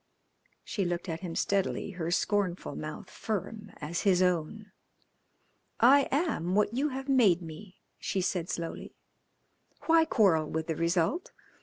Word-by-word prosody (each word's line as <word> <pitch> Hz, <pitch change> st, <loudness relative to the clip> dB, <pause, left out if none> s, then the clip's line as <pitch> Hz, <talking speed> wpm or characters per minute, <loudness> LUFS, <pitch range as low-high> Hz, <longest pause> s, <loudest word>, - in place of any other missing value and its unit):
She 200 Hz, -, -2 dB
looked 175 Hz, +1 st, -2 dB
at 165 Hz, 0 st, -3 dB
him 170 Hz, -2 st, -6 dB
steadily, 200 Hz, 0 st, 0 dB
her 170 Hz, -3 st, -4 dB
scornful 190 Hz, 0 st, 0 dB
mouth 155 Hz, 0 st, -6 dB
firm 210 Hz, 0 st, -5 dB
as 160 Hz, +3 st, -3 dB
his 190 Hz, -3 st, +3 dB
own. 180 Hz, +4 st, -1 dB, 1.1 s
"I 275 Hz, +4 st, +6 dB
am 275 Hz, -, 0 dB
what 210 Hz, +1 st, +2 dB
you 280 Hz, +5 st, +1 dB
have 270 Hz, 0 st, -6 dB
made 215 Hz, -10 st, +4 dB
me," 170 Hz, +4 st, -11 dB, 0.2 s
she 195 Hz, -, -2 dB
said 180 Hz, -2 st, -1 dB
slowly. 165 Hz, -1 st, -5 dB, 0.9 s
"Why 325 Hz, 0 st, +5 dB
quarrel 175 Hz, -, +3 dB
with 160 Hz, 0 st, -2 dB
the 160 Hz, -, -2 dB
result? 170 Hz, -, 0 dB
190 Hz, 140 wpm, -29 LUFS, 170-220 Hz, 1.1 s, I